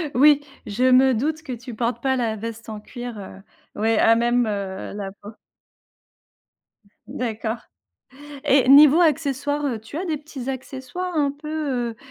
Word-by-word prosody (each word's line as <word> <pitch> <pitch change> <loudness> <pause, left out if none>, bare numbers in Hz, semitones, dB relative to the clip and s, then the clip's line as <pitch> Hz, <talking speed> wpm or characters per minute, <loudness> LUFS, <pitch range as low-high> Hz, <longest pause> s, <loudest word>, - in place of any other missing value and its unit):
Oui, 290 +3 +6 0.2
je 215 +4 -2
me 260 +1 +5
doute 305 +7 -2
que 290 - -7
tu 245 0 -8
portes 235 +1 -2
pas 265 0 +1
la 230 -4 -1
veste 230 +1 -7
en 215 -1 -6
cuir, 240 +1 -8
heu, 195 0 -10 0.4
ouais, 225 0 +2
à 225 - +5
même, 240 +1 +2
heu, 200 -2 -4
la 200 -2 -5
peau. 205 +2 -10 1.7
D'accord 225 -1 -3 0.9
et 270 -3 +4
niveau 295 +3 +8
accessoires, 290 -2 +1
heu, 235 -5 -2
tu 225 +7 -10
as 365 - -3
des 325 -4 -1
petits 285 -4 -8
accessoires 265 +7 -5
un 285 -2 +2
peu, 285 -5 -3
heu - - -18
255 Hz, 160 wpm, -23 LUFS, 225-290 Hz, 1.7 s, niveau